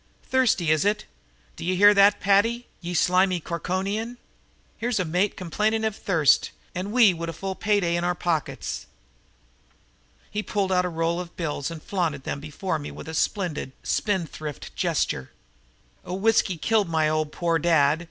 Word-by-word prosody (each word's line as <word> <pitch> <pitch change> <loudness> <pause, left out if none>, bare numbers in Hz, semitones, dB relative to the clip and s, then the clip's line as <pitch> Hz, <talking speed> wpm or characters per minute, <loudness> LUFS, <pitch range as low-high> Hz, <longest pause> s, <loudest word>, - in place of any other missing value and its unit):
"Thirsty, 225 -11 +2
is 155 -1 +3
ut? 205 +1 0 0.5
D'ye 185 +2 -1
hear 205 +3 +7
that, 200 0 +5
Paddy, 225 +5 +2 0.2
ye 175 0 -4
slimy 180 +2 +3
Corkonian? 190 +8 -3 0.6
Here's 235 -1 0
a 185 - 0
mate 180 +5 0
complainin' 215 +5 0
av 220 -2 -1
thirst 165 -7 +3 0.2
and 185 +3 -4
we 225 -5 +6
wid 170 0 -5
a - - -4
full 195 +4 -4
pay 205 +2 +1
day 170 -1 +1
in 170 - -1
our 175 0 +1
pockets." 155 - -2 1.4
He 210 - -1
pulled 200 -2 -1
out 180 -1 +3
a - - -1
roll 165 +1 -1
of 175 -1 -8
bills 150 -4 -2
and 165 -2 -8
flaunted 165 -8 -2
them 140 - -4
before 155 +3 -3
me 145 - -6
with - - -10
a 160 - -6
splendid, 160 -6 -1
spendthrift 165 - -3
gesture. 65 - -1 0.7
"Oh, 180 - -5
whiskey 200 -2 +2
killed 210 +2 +1
my 160 -1 +2 0.2
poor 170 0 0
old - - -6
dad! 155 -2 +3
180 Hz, 165 wpm, -25 LUFS, 165-205 Hz, 1.4 s, hear